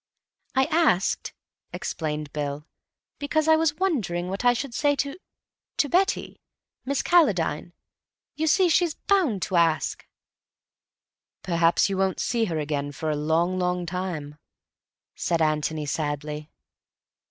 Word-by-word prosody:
"I 265 0 +4
asked," 310 - +2 0.4
explained 150 -2 -4
Bill, 145 0 -3 0.5
"because 310 +2 0
I 320 - +7
was 315 -2 +1
wondering 215 - -1
what 195 +5 -4
I 245 - +6
should 245 +1 -3
say 285 +3 +2
to—to 285 0 -5
Betty. 385 +5 0 0.4
Miss 280 +1 -1
Calladine. 180 - +2 0.6
You 315 +1 -1
see, 370 +4 +4
she's 340 -2 +2
bound 325 - +1
to 190 - 0
ask." 165 -2 +1 1.4
"Perhaps 170 -1 +3
you 195 -1 -2
won't 190 -1 0
see 235 -2 +1
her 165 -6 -2
again 145 -1 -2
for 155 +2 -3
a - - 0
long, 165 +5 +1
long 180 0 0
time," 165 -5 -5 0.7
said 170 -1 -1
Antony 155 0 0
sadly. 150 +1 -3
180 Hz, 125 wpm, -25 LUFS, -, 1.4 s, I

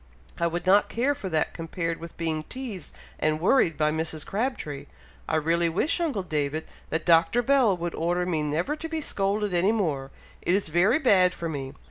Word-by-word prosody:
"I 170 - +2
would 175 +1 -3
not 200 +3 +4
care 255 +5 +1
for 200 -8 -6
that 160 -2 0
compared 165 0 -3
with 170 0 -10
being 160 -2 -1
teazed 235 - -6 0.3
and 155 0 +1
worried 175 - +3
by 150 -1 +2
Mrs. 160 0 -3
Crabtree. 200 - -3 0.4
I 160 - +1
really 165 +2 +2
wish, 200 - +1
uncle 290 - -1
David, 155 -2 -2 0.2
that 160 0 -2
Dr. 170 +8 +4
Bell 255 -7 +3
would 175 0 -3
order 175 +2 0
me 165 -4 0
never 155 - -1
to 325 +1 -6
be 320 0 -2
scolded 205 -6 -1
any 180 +4 +3
more! 155 -11 -1 0.3
It 180 - +2
is 195 -5 -1
very 180 - +4
bad 190 - +4
for 170 - -4
me! 140 -4 -5
175 Hz, 190 wpm, -26 LUFS, 160-210 Hz, 0.4 s, not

